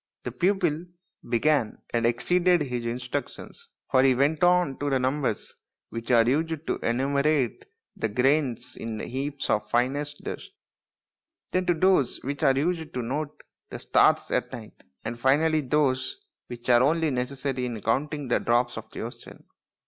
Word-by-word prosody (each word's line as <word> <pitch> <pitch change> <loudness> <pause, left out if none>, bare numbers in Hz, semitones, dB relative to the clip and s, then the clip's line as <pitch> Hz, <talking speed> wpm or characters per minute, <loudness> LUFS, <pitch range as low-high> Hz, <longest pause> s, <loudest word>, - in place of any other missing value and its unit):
The - - -4
pupil 180 -3 0 0.4
began 120 -1 +1
and 115 0 +2
exceeded 175 +8 +2
his 125 -3 -3
instructions, 125 - -5 0.2
for 130 - +5
he 130 -1 +4
went 145 +5 +1
on 175 -6 +3
to 145 - -1
the 135 - +2
numbers 130 -3 -1 0.4
which 115 0 -6
are 115 -2 +5
used 160 +3 0
to - - -2
enumerate 140 - 0 0.3
the 185 - -2
grains 130 +3 +1
in 115 -1 -5
heaps 140 +4 -3
of 105 - 0
finest 145 +4 -1
dust, - - -7 1.0
then 185 -1 0
to 175 - +3
those 185 -5 +3
which 140 +2 -4
are 135 0 +4
used 160 +1 -1
to 125 - -2
note 145 +5 -4 0.3
the - - -6
stars - - +3
at - - 0
night, - - -10 0.2
and 120 - -4
finally 155 +5 +3
those 130 -1 0 0.3
which 120 -1 -9
are 120 0 +6
only 160 +3 +2
necessary 130 0 -2
in 115 -3 -5
counting 140 +6 -1
the 120 - +2
drops 120 0 +1
of 110 0 -13
the - - -7
ocean. 115 +2 -9
135 Hz, 155 wpm, -26 LUFS, 120-155 Hz, 1.0 s, are